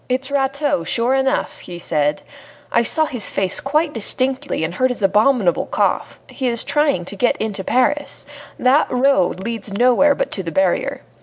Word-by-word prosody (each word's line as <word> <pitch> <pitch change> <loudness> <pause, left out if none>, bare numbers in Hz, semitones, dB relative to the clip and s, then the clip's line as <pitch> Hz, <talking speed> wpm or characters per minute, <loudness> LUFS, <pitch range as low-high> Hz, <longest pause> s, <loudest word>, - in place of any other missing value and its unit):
"It 255 +1 -1
is 275 - -6
Rateau, 280 - 0
sure 235 +8 0
enough," 265 0 -1
he 175 - -9
said. 150 -3 -1 0.5
"I 235 - +3
saw 315 +7 +3
his 245 -7 0
face 190 -1 0
quite 300 +3 0
distinctly 260 - -1
and 160 +2 -3
heard 255 +7 +1
his 245 -4 -5
abominable 210 -1 +2
cough. - - -1
He 265 - -4
is 235 -1 +1
trying 290 - 0
to 200 - -3
get 240 +5 +1
into 205 -3 -3
Paris. 270 +7 0 0.3
That 265 +4 +3
road 255 -8 +1
leads 225 0 -5
nowhere 250 +7 +3
but - - -3
to 195 - -2
the 170 -3 -6
barrier. 190 +1 0
245 Hz, 175 wpm, -19 LUFS, 195-275 Hz, 0.5 s, I